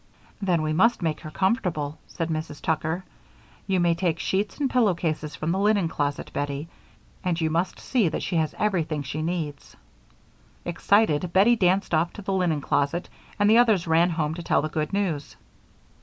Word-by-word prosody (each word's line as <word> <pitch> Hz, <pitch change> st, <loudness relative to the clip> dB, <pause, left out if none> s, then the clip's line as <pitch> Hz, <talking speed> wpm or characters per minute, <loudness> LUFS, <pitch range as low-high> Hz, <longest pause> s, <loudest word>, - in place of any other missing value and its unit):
"Then 175 Hz, -5 st, +1 dB
we 155 Hz, 0 st, 0 dB
must 220 Hz, +4 st, +3 dB
make 160 Hz, -2 st, -1 dB
her 155 Hz, -, -8 dB
comfortable," 170 Hz, -, -1 dB
said 165 Hz, -1 st, -4 dB
Mrs. 155 Hz, -2 st, -4 dB
Tucker. 160 Hz, +3 st, -1 dB, 0.6 s
"You 190 Hz, -2 st, +2 dB
may 175 Hz, -1 st, +3 dB
take 170 Hz, -1 st, 0 dB
sheets 200 Hz, +4 st, -1 dB
and 285 Hz, -, +2 dB
pillow 235 Hz, -8 st, +3 dB
cases 155 Hz, -2 st, -3 dB
from 155 Hz, +2 st, -2 dB
the 190 Hz, -, 0 dB
linen 205 Hz, -3 st, +3 dB
closet, 145 Hz, -2 st, -2 dB
Bettie, 145 Hz, +1 st, -3 dB, 0.6 s
and 175 Hz, -2 st, 0 dB
you 160 Hz, -1 st, 0 dB
must 170 Hz, +3 st, -1 dB
see 230 Hz, -10 st, +1 dB
that -, -, -3 dB
she 175 Hz, -, -1 dB
has 155 Hz, -2 st, 0 dB
everything 165 Hz, -8 st, 0 dB
she 145 Hz, +3 st, -4 dB
needs." 160 Hz, -4 st, -4 dB, 0.9 s
Excited 175 Hz, -2 st, +2 dB
Bettie 200 Hz, +7 st, +5 dB
danced 190 Hz, -2 st, +1 dB
off 165 Hz, +2 st, +2 dB
to 205 Hz, -, -9 dB
the 195 Hz, -, -2 dB
linen 175 Hz, -6 st, +1 dB
closet 145 Hz, +6 st, 0 dB, 0.3 s
and 205 Hz, 0 st, +3 dB
the 225 Hz, +2 st, +6 dB
others 220 Hz, -7 st, +4 dB
ran 165 Hz, +2 st, +3 dB
home 160 Hz, -2 st, -1 dB
to 170 Hz, -, -6 dB
tell 165 Hz, -, +1 dB
the 155 Hz, -, -2 dB
good 155 Hz, -1 st, -2 dB
news. 180 Hz, -8 st, -2 dB
170 Hz, 185 wpm, -25 LUFS, 155-190 Hz, 0.9 s, the